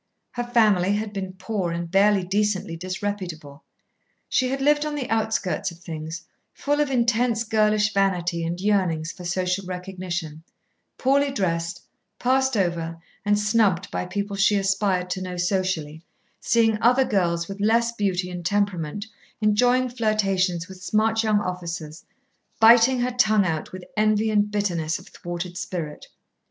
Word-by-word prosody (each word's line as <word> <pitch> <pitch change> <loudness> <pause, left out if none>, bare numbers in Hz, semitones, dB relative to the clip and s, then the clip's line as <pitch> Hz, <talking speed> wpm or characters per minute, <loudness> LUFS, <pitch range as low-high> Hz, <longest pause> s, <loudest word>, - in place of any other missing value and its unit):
Her 240 -1 -3
family 210 -6 +3
had 210 0 -3
been 190 -2 -4
poor 190 -2 -3
and 170 0 -4
barely 200 0 +4
decently 195 -2 -1
disreputable. 180 -5 -5 0.6
She 255 - +1
had 270 +1 -2
lived 295 +2 +3
on 300 -1 -3
the 270 -4 -3
outskirts 220 -6 0
of 170 - -12
things, 160 -1 -7 0.3
full 290 +1 -1
of 295 -2 +2
intense 235 -2 +1
girlish 215 -1 +2
vanity 180 -4 +1
and 170 +2 -3
yearnings 185 -5 +1
for 180 - -11
social 180 +2 -1
recognition, 180 -4 -5 0.6
poorly 280 +2 +2
dressed, 170 -9 -2 0.3
passed 265 0 +1
over 165 -3 -1 0.2
and 205 0 +2
snubbed 205 -3 +1
by 180 - -3
people 200 +2 -3
she 195 +1 +3
aspired 195 -2 0
to 185 - -2
know 180 -1 -5
socially, 175 -4 -1 0.4
seeing 225 -2 +2
other 250 +3 +4
girls 170 -5 0
with 200 +1 -7
less 230 +2 +3
beauty 190 -5 -1
and 175 -1 -6
temperament 200 -1 -1 0.3
enjoying 245 +4 +3
flirtations 195 -7 0
with 190 -1 -12
smart 220 +3 +1
young 215 -2 +2
officers, 170 -4 -5 0.6
biting 235 +3 +6
her 250 +1 0
tongue 215 -5 +3
out 160 -3 -2
with 185 0 -8
envy 215 0 +2
and 210 -1 +2
bitterness 175 -6 -1
of - - -14
thwarted 175 +1 -6
spirit. 165 -5 -5
195 Hz, 145 wpm, -24 LUFS, 175-220 Hz, 0.6 s, biting